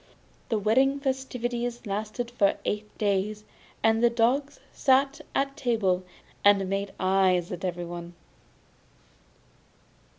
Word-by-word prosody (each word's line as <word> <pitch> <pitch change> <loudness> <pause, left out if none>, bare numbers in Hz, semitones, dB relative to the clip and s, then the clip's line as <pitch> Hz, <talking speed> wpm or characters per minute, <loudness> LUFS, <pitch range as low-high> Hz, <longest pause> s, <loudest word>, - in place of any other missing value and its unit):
The 225 - +1
wedding 260 +7 +3
festivities 245 -3 -3
lasted 215 +4 -3
for 205 -5 +2
eight 210 0 -3
days, 210 +1 0 0.4
and 225 0 +3
the 240 - +6
dogs 255 +5 +1
sat 270 +1 +2
at 275 0 0
table 215 -10 +1 0.4
and 200 -1 +5
made 195 +1 -2
eyes 185 -2 +2
at 180 - -6
everyone. 175 -1 -5
215 Hz, 105 wpm, -27 LUFS, 195-245 Hz, 0.4 s, the